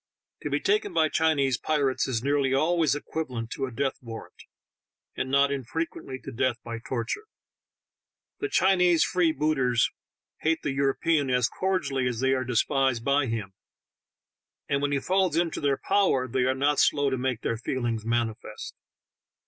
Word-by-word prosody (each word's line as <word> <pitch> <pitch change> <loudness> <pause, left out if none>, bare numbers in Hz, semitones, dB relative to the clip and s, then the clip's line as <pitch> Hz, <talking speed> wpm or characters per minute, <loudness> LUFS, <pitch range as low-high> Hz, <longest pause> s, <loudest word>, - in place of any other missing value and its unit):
To - - -3
be - - 0
taken 410 -1 0
by 155 - +4
Chinese 145 -6 +2
pirates 140 -4 0
is 120 -3 -2
nearly 140 -1 +2
always 160 0 +2
equiva 155 +1 -4
lent 115 -2 -5
to 135 - -2
a - - -8
death 135 +3 -2
warrant, 115 -2 -10 0.7
and 130 - -3
not 140 +1 +3
infrequently 140 0 -4
to 135 - -7
death 130 0 0
by 115 -1 -5
torture. 120 - -4 1.1
The 415 - -2
Chinese 180 - +4
free 175 -3 +2
booters 135 -5 +1 0.5
hate 160 +1 0
the 145 - -1
European 140 +2 +1
as 125 -2 +2
eordially 160 -9 0
as 120 -2 -4
they 130 +1 +2
are 130 -1 0
despised 125 0 +1
by 140 0 +2
him, 110 -4 -4 1.1
and 140 -1 0
when 145 0 0
he 140 - +1
falls 185 0 +1
into 170 -1 0
their 140 -1 +1
power 190 -10 +2
they 125 +1 0
arenot 135 +3 +1
slow 145 -1 +3
to 130 - 0
make 130 -2 -1
their 115 - -1
feelings 120 -2 -2
manifest. 115 -1 -3
135 Hz, 160 wpm, -27 LUFS, 125-155 Hz, 1.1 s, by